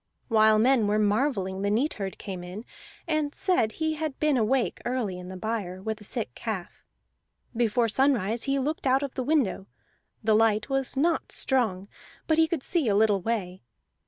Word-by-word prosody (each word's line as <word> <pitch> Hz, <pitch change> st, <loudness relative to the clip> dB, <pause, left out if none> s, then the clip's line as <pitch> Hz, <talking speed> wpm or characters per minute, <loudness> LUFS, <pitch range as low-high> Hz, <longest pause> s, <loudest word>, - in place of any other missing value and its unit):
While 220 Hz, -1 st, +5 dB
men 235 Hz, -1 st, +3 dB
were 210 Hz, +1 st, +2 dB
marvelling 205 Hz, -3 st, 0 dB
the 200 Hz, -, 0 dB
neatherd 210 Hz, -4 st, -1 dB
came 185 Hz, -3 st, -6 dB
in, 185 Hz, +6 st, -8 dB, 0.4 s
and 310 Hz, -2 st, -1 dB
said 290 Hz, -, +1 dB
he 315 Hz, +3 st, -1 dB
had 310 Hz, -2 st, -4 dB
been 305 Hz, -2 st, +2 dB
awake 245 Hz, +2 st, +1 dB
early 235 Hz, -7 st, -2 dB
in 180 Hz, 0 st, -9 dB
the 185 Hz, -, -7 dB
byre, 195 Hz, -3 st, -3 dB
with 220 Hz, +2 st, -4 dB
a -, -, -10 dB
sick 210 Hz, -, -4 dB
calf. 205 Hz, -, -6 dB, 0.7 s
Before 230 Hz, 0 st, +2 dB
sunrise 230 Hz, -3 st, +1 dB
he 275 Hz, 0 st, +1 dB
looked 280 Hz, +1 st, -2 dB
out 265 Hz, +2 st, +3 dB
of 275 Hz, -, -4 dB
the -, -, -3 dB
window; 250 Hz, -9 st, 0 dB, 0.6 s
the 220 Hz, 0 st, +3 dB
light 220 Hz, +3 st, +2 dB
was 270 Hz, 0 st, -1 dB
not 325 Hz, +4 st, +1 dB
strong, 215 Hz, -8 st, 0 dB, 0.4 s
but 315 Hz, 0 st, +2 dB
he 320 Hz, -, +5 dB
could 320 Hz, -4 st, -3 dB
see 335 Hz, -8 st, +1 dB
a 205 Hz, -, +2 dB
little 205 Hz, -2 st, +3 dB
way. 190 Hz, -4 st, -3 dB
225 Hz, 180 wpm, -27 LUFS, 205-270 Hz, 0.7 s, While